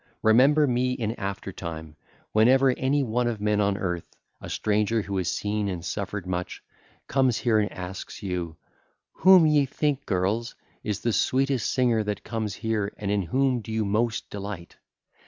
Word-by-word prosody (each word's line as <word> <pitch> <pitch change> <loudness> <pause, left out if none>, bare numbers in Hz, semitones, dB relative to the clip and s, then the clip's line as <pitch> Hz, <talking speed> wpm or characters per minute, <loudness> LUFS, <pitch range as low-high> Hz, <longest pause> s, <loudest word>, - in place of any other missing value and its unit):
Remember 135 +7 +5
me 125 -1 +1
in 115 -4 -2
after 100 0 -4
time 80 -4 -7 0.4
whenever 130 +5 +5
any 135 +3 +1
one 120 0 0
of 115 -3 -2
men 105 0 +1
on 100 -1 +1
earth, 90 -4 -4 0.3
a - - -8
stranger 105 +1 0
who 100 0 -4
has 90 -3 0
seen 105 0 -1
and 90 -3 -5
suffered 100 0 -4
much, 90 0 -4 0.4
comes 130 -4 +2
here 115 -4 +2
and 105 - 0
asks 95 0 -7
of - - -13
you: 90 -4 -4 0.5
'Whom 185 -2 +6 0.2
think 145 0 0
ye, - - -40
girls, 100 +5 -1 0.3
is 105 -2 -3
the 115 - 0
sweetest 130 +2 +1
singer 120 -4 +2
that 105 -1 -4
comes 110 -4 -3
here, 110 -2 -2
and 100 -1 -3
in 105 -1 +1
whom 130 +6 +1
do 110 - -8
you 110 -1 0
most 110 +3 0
delight? 100 -4 -7
105 Hz, 175 wpm, -26 LUFS, 100-125 Hz, 0.5 s, Whom